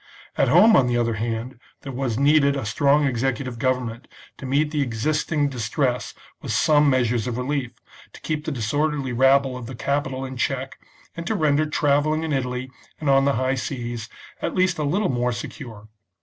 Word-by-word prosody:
At 135 - +2
home, 190 - +6
on 125 - +4
the 120 0 +1
other 115 -1 +1
hand, 115 +3 -4 0.2
there 135 - -6
was 125 -3 -2
needed 140 0 +4
a 135 -4 -3
strong 140 +7 +2
executive 130 -1 -2
government 125 -1 -2 0.3
to 135 - -6
meet 145 +3 +1
the 150 -2 0
existing 145 +5 0
distress 125 0 -2 0.3
with - - -5
some 150 -1 +4
measures 120 -3 +1
of 120 -1 -3
relief, 125 -1 -2 0.4
to - - -13
keep 155 -1 -3
the - - -2
disorderly 140 +2 -1
rabble 135 +1 +3
of 125 -2 -7
the 130 - -7
capital 135 0 -2
in 130 -1 -7
check, 135 +1 -2 0.4
and 170 0 -6
to 220 - 0
render 155 -3 +2
travelling 150 +1 +1
in 160 -2 -2
Italy 125 -1 -3 0.3
and 150 -3 +1
on 135 0 +4
the 140 - +3
high 130 +2 0
seas 120 -4 -4 0.3
at - - -2
least 185 -3 +2
a - - 0
little 185 +8 0
more 125 -1 0
secure. 115 -3 -8
135 Hz, 185 wpm, -23 LUFS, 125-145 Hz, 0.4 s, home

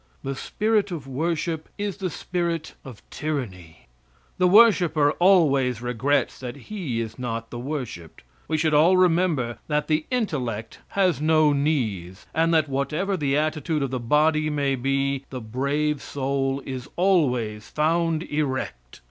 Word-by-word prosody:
The 135 - -2
spirit 210 +8 0
of 165 -7 -5
worship 160 +3 -2
is 205 -2 -3
the 190 -3 -2
spirit 170 -1 -3
of 125 -5 -12
tyranny. 95 - -5 0.5
The 180 - +5
worshiper 180 -8 +5
always 140 - +4
regrets 125 +4 0
that 125 -2 -6
he 145 - -4
is 115 +1 -5
not 115 -2 -4
the 120 - -5
worshiped. 120 - -6 0.2
We 155 - 0
should 155 0 +1
all 165 +5 +5
remember 165 -9 +2
that 150 -1 0
the 155 0 0
intellect 125 - -2 0.2
has 185 -6 +2
no 155 -1 +4
knees, 110 - -1
and 165 +1 +2
that 160 -2 +3
whatever 150 +8 -1
the 145 -5 0
attitude 155 0 -1
of 135 - -3
the 130 - -2
body 155 +5 +2
may 140 -2 0
be, 135 +1 -1
the 130 - -5
brave 140 +6 -1
soul 135 0 -2
is 130 0 -6
always 125 - +1
found 165 +1 +1
erect. 130 - -3
145 Hz, 145 wpm, -24 LUFS, 130-165 Hz, 0.5 s, The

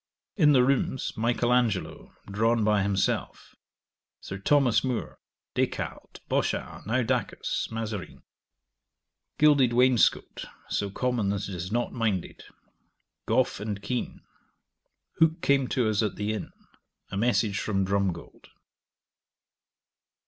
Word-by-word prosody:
In 150 -7 +5
the 125 -2 +5
rooms, 130 0 0
Michael 120 +1 +1
Angelo, 115 -6 -1
drawn 115 +3 +1
by 105 -1 +3
himself, 100 -1 -1 0.7
Sir 95 - -7
Thomas 130 +2 +3
More, 125 -3 -3 0.3
Des - - +2
Cartes, - - -7
Bochart, - - -2
Naudacus, 115 +1 -1
Mazarine. 110 -4 -5 1.1
Gilded 145 -5 +5
wainscot, 125 -1 +2 0.2
so 100 - -1
common 120 -1 -1
that 100 0 -2
it 100 - -6
is 90 +2 -5
not 120 +2 -1
minded. 110 -7 -2 0.9
Gough - - +1
and 105 -1 -4
Keene. 125 -1 -3 1.0
Hooke 160 +1 +4
came 140 -2 +3
to 125 -3 0
us 110 -1 +1
at 105 -3 -1
the 105 +1 -2
inn. 110 - -5 0.6
A - - -4
message 110 -2 +1
from 95 -3 0
Drumgold. 95 -3 -2
115 Hz, 115 wpm, -27 LUFS, 100-125 Hz, 1.1 s, In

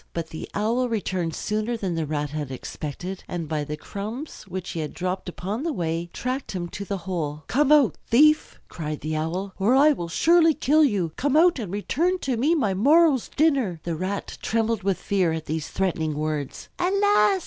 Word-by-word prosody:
But 170 -1 -4
the 160 - -7
Owl 235 +5 +1
returned 185 -7 -2
sooner 215 +3 -2
than 190 -5 -2
the 165 -2 -2
Rat 145 -1 -2
had 150 -3 -4
expected, 155 +7 -6
and 170 -3 -4
by 150 -1 -1
the 150 +1 -5
crumbs 220 - -7
which 185 -1 -5
he 170 - -4
had 155 -1 -4
dropped 185 +1 -3
upon 195 +6 -4
the 330 +2 -1
way 170 - -2
tracked 255 0 -3
him 175 -2 -3
to 200 - -6
the 200 0 -3
hole. 155 -5 -3
"Come 290 +3 +2
out, 290 -5 +5
thief!" 305 +6 +4
cried 155 -2 -5
the 155 +1 -2
Owl, 175 +5 -2
"or 215 +7 +3
I 295 +3 +6
will 175 - -3
surely 330 - +4
kill 305 +4 +4
you. 200 - +1
Come 285 +2 +2
out 340 -2 +5
and 205 -7 -5
return 325 - 0
to 260 -2 0
me 285 +9 +2
my 220 -11 +1
morrow's 285 - +4
dinner." 270 - +1
The 170 -1 -2
Rat 190 +4 -4
trembled 225 -1 0
with 195 -1 0
fear 185 -5 +1
at 160 -1 -4
these 160 0 -3
threatening 160 -5 -1
words. 150 -2 -3
"Alas!" 360 - +3
195 Hz, 195 wpm, -25 LUFS, 165-265 Hz, -, I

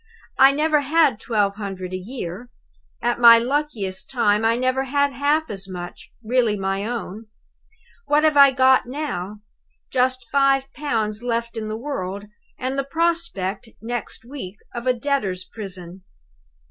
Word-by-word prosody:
I 270 +1 +8
never 300 +1 +2
had 290 -4 +3
twelve 205 -4 0
hundred 190 -3 -6
a - - -1
year. 195 +1 -6 0.5
At 240 0 0
my 235 -1 +9
luckiest 235 -7 -2
time, 210 -4 +2
I 225 +1 +3
never 255 +1 0
had 285 +1 +1
half 295 +4 +1
as 195 -1 -5
much, 175 -1 -8
really 230 -2 +1
my 195 +1 -2
own. 225 -2 -5 0.8
What 295 +1 +3
have 310 -1 +3
I 280 -1 +9
got 260 -1 +4
now? 215 -8 -5 0.5
Just 255 -1 +1
five 275 -1 +2
pounds 220 -7 -2
left 235 -1 -2
in 220 -1 -4
the 215 0 -4
world 205 -7 -5 0.3
and 260 +2 -2
the - - 0
prospect 275 - -1
next 230 -1 -5
week 240 -8 -8 0.2
of 240 +1 -5
a 255 - +4
debtor's 230 -8 -1
prison. 185 -4 -8
240 Hz, 145 wpm, -22 LUFS, 205-275 Hz, 0.8 s, my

